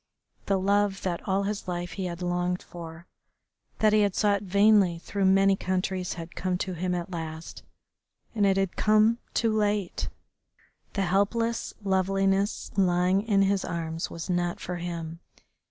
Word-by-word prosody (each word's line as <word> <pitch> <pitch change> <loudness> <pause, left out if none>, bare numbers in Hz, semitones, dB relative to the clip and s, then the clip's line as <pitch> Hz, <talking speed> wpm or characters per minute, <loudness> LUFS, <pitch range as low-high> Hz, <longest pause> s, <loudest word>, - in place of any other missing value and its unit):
The 195 - +2
love 200 +1 +1
that 175 -2 -2
all 195 +1 +1
his 200 -1 -3
life 175 0 -3
he 190 - -4
had 175 0 -5
longed 180 0 -1
for, 170 -1 -10 0.7
that 215 -1 +3
he 215 - +5
had 200 -2 +1
sought 205 -2 +2
vainly 200 -2 +4
through 195 +3 -2
many 195 +1 +5
countries, 185 -1 -2
had 165 -1 -9
come 185 -1 -1
to 185 0 -3
him 180 +1 -1
at 175 +1 -4
last, 160 -1 -6 0.7
and 215 -3 0
it 195 -1 +3
had 195 -2 0
come 215 +2 +3 0.2
too 225 -2 +2
late. 205 -3 0 0.8
The 200 - 0
helpless 205 +5 0
loveliness 195 +1 +1
lying 185 0 +3
in 200 -3 +4
his 195 0 +1
arms 165 -1 -3
was 165 0 -6
not 175 -1 -1
for 180 0 -4
him. 170 -1 -5
190 Hz, 155 wpm, -27 LUFS, 175-200 Hz, 0.8 s, he